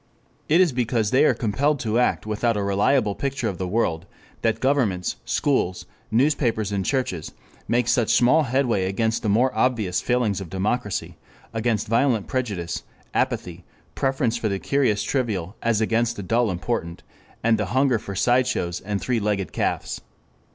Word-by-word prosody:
It 160 +4 +5
is 180 -4 +4
because 115 -4 0
they 135 +4 +5
are - - +4
compelled 140 +6 0
to 115 0 0
act 125 - +1
without 110 +1 0
a 100 - -1
reliable 100 +3 +2
picture 135 0 -2
of 95 -5 -4
the 95 - -2
world, 90 -4 -1 0.3
that 115 -1 +1
governments, 125 -10 +1
schools, 130 -11 0 0.2
newspapers 120 -4 +1
and 100 -1 -1
churches 95 - -2 0.3
make 120 0 +1
such 120 -2 +2
small 125 +7 +5
headway 120 -6 +1
against 110 +4 0
the 110 - -1
more 120 +6 +2
obvious 110 -8 +1
failings 120 -6 0
of 90 - -7
democracy, 105 +2 -2 0.4
against 115 -2 0
violent 115 -1 +2
prejudice, 100 -11 -3 0.3
apathy, 85 0 -1 0.3
preference 135 -3 0
for 110 -2 -1
the 100 - -1
curious 125 -2 +1
trivial 105 -8 -2
as 115 -2 +1
against 115 +1 +1
the 100 - -6
dull 115 +4 +1
important, 90 -2 -3 0.4
and 110 -1 +3
the 105 - 0
hunger 130 +2 +2
for 100 -1 -7
sideshows 120 -6 +1
and 100 0 -3
three 125 -2 0
legged 100 -4 -1
calves. - - -2
115 Hz, 160 wpm, -23 LUFS, 100-125 Hz, 0.4 s, It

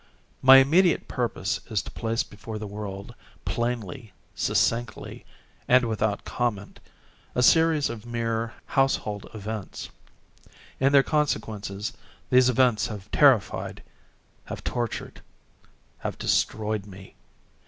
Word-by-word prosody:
My 135 +1 +9
immediate 165 +7 +4
purpose 115 -3 -2
is 110 -4 0
to - - -9
place 115 0 -1
before 110 +2 -8
the 105 - -6
world, 100 -1 -7 0.3
plainly, 120 -1 -3 0.2
succinctly, 115 0 -1 0.4
and 125 0 +5
without 110 -2 -1
comment, 105 -5 -3 0.6
a 125 - +2
series 160 +1 +4
of 115 -2 -7
mere 115 -1 -2
household 110 -6 0
events. 105 -1 -6 0.9
In 135 +1 +3
their 140 -1 +6
consequences, 110 -7 -2 0.4
these 125 0 +6
events 125 -4 +3
have 105 -2 -8
terrified—have 135 -8 -1
tortured—have 120 -2 -7
destroyed 105 -1 0
me. 95 -1 -12
115 Hz, 100 wpm, -26 LUFS, 105-130 Hz, 0.9 s, My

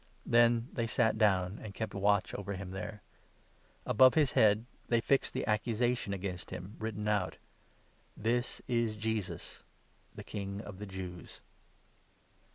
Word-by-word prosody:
Then 120 0 +4
they 115 -2 -1
sat 110 -1 +2
down, 95 -2 +2
and 100 -3 -8
kept 110 +3 -3
watch 100 +1 +2
over 100 0 -4
36 95 - -5
him 90 - -8
there. 100 +2 -6 0.8
Above 130 +3 +6
his 150 -5 +4
head 110 +1 +4 0.2
they 120 - +3
fixed 135 +4 +2
the - - -2
accusation 115 +1 0
against 95 -2 -4
37 90 +3 -7
him - - -13
written 105 -1 -3
out 105 -3 0 0.4
— - - -35
'THIS 120 +3 -1
IS 115 -3 0
JESUS 110 -2 -3 0.5
THE - - -7
KING 100 -1 -5
OF 100 -3 -9
THE 105 - -6
JEWS.' 90 -2 -8
105 Hz, 155 wpm, -32 LUFS, 100-115 Hz, 0.8 s, Above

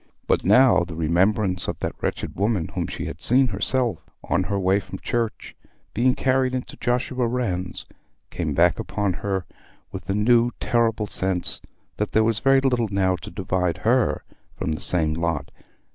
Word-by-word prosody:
But - - +1
now 105 -2 +5
the 85 -2 -7
remembrance 90 +4 +1
of - - -3
that - - -3
wretched - - -3
woman 100 -5 0
whom - - -3
she - - -5
had 75 - -7
seen 130 +2 +4
herself, 115 +4 0 0.2
on 85 - 0
her 100 0 -1
way 95 +1 +2
from 95 -1 -8
church, 115 +2 -3 0.4
being 125 +3 +2
carried 130 -1 +1
into 125 - -5
Joshua 125 0 0
Rann's, 95 -7 -3 0.5
came - - -3
back - - +3
upon 100 -2 -1
her 95 -3 -2 0.5
with - - -7
the 100 - -1
new 120 +3 +4
terrible 115 -3 +1
sense 95 -3 0 0.4
that 105 - -2
there 110 - +4
was 110 -1 +1
very 135 0 +4
little 125 -4 +1
now 95 -2 +1
to 105 - -9
divide 90 -4 -1
her 120 0 +2 0.3
from - - -2
the 75 - -3
same 80 -3 +2
lot. 80 -3 -2
105 Hz, 170 wpm, -23 LUFS, 90-120 Hz, 0.5 s, now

